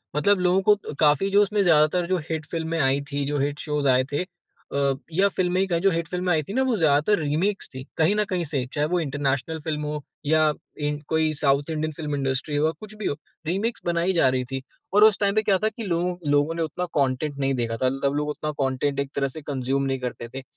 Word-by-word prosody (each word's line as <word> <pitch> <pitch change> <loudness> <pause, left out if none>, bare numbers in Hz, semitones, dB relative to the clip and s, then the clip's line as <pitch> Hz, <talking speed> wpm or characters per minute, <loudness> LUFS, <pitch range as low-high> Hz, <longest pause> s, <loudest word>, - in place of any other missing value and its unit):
मतलब 200 +6 +3
लोगों 180 +1 +3
को 205 -7 0
काफ़ी, 150 +5 +4
जो 200 +1 +5
उसमें 205 0 +2
ज़्यादातर 170 +1 +3
जो 185 0 +1
हिट 160 -1 -2
फ़िल्में 165 -1 -2
आई 135 0 +2
थीं, 140 0 -1
जो 145 0 -1
हिट 145 +1 -1
शोज़ 150 -2 -1
आए 130 0 +4
थे 145 +5 0 0.5
अ, 140 -1 +2 0.2
या 195 +4 +4
फ़िल्में 180 0 +1
ही 195 - +1
कहें, 170 -2 +1
जो 195 - +4
हिट 165 -1 -1
फ़िल्में 180 0 -1
आई 155 -2 +1
थीं 195 - -7
ना, 260 - +2
वो 260 -3 +1
ज़्यादातर 155 +4 +3
रीमेक्स 160 +7 -1
थीं, 130 - -6
कहीं 165 +6 +3
न 210 - +2
कहीं 180 -2 0
से। 140 -4 -2
चाहे 150 0 +1
वो 180 +1 +1
इंटरनेशनल 145 +1 -1
फ़िल्म 150 -1 -3
हो 150 0 -3 0.2
या 155 +1 +4 0.4
इन 150 0 -2
कोई 160 -1 +1
साउथ 140 0 +1
इंडियन 155 0 -2
फ़िल्म 150 -1 -4
इंडस्ट्री 135 +2 -1
हो 145 - +2
या 160 - +2
कुछ 215 0 -10
भी 215 -1 -6
हो, - - -1 0.3
रीमेक्स 215 +7 -1
बनाई 175 +2 +1
जा 165 -6 +4
रही 130 0 0
थीं 135 0 -3 0.3
और 210 - +6
उस 215 -2 +6
टाइम 200 0 +2
पे 215 - +4
क्या 200 -3 +3
था 215 - +3
कि 225 +1 -8
लोग 180 -1 -1
लोगों 145 +2 +3
ने 165 - -2
उतना 180 +3 -3
कॉन्टेंट 140 +1 0
नहीं 135 0 +1
देखा 115 -2 -2
था, 130 +2 +2
तब 140 0 +2
लोग 150 0 -1
उतना 150 +1 -3
कॉन्टेंट 140 +1 0
एक 140 - -1
तरह 140 -1 +1
से 145 +4 -6
कंज़्यूम 135 -1 -1
नहीं 135 -1 -1
करते 125 -2 -5
थे। 135 0 -6
155 Hz, 245 wpm, -24 LUFS, 140-180 Hz, 0.5 s, और